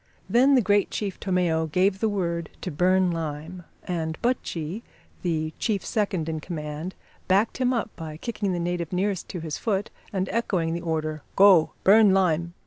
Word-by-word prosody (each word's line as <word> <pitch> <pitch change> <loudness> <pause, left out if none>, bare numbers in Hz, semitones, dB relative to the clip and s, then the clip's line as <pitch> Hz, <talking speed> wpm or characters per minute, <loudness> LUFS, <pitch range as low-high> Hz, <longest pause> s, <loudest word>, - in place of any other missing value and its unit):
Then 265 +4 +5
the 250 - +4
great 205 0 +3
chief 200 -3 -4
Tomeo 175 -4 +1
gave 185 +5 +1
the 220 - +1
word 170 -5 -2
to 180 - -4
burn 185 +3 +3
lime, 165 +2 -5 0.2
and 160 -3 -3
Buttchee, 200 -6 -2 0.4
the 160 -3 -1
chief 210 -4 -1
second 195 -7 -1
in 160 -1 -2
command, 155 +1 -5 0.3
backed 200 +4 +2
him 255 -1 +2
up 230 -3 -2
by 155 -2 -7
kicking 205 0 -3
the 175 - -1
native 170 -1 -2
nearest 190 0 -1
to 175 - -5
his 160 -2 -4
foot 205 -2 -1 0.2
and 190 -1 -1
echoing 185 -7 0
the 170 - -3
order, 155 -2 -2
"Go, 190 -5 +6
burn 205 0 +6
lime!" 170 -2 +1
180 Hz, 170 wpm, -25 LUFS, 160-200 Hz, 0.4 s, Go